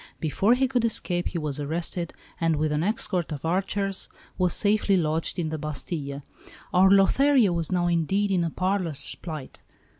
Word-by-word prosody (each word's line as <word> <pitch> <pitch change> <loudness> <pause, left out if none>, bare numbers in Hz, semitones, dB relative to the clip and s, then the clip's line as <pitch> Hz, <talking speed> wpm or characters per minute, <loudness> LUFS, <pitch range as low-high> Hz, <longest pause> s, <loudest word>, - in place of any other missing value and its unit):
Before 195 +9 +2
he 265 +1 +2
could 245 -2 0
escape, 180 -6 -1
he 175 - -3
was 150 -3 -3
arrested, 170 +3 -3 0.3
and 165 -1 +2
with 150 0 0
an 150 0 0
escort 185 -3 -1
of 145 0 -5
archers 195 +3 -1 0.3
was 180 -1 +1
safely 205 -2 +2
lodged 160 0 -1
in 165 -3 -1
the 155 0 -4
Bastille. 145 -1 -5 0.5
Our 185 +1 +6
Lothario 215 +3 +4
was 170 -1 -1
now 180 -1 +1
indeed 175 +4 +1
in 180 -3 +2
a 165 - 0
parlous 180 -5 0
plight. 155 -6 -8
175 Hz, 170 wpm, -26 LUFS, 155-195 Hz, 0.5 s, Our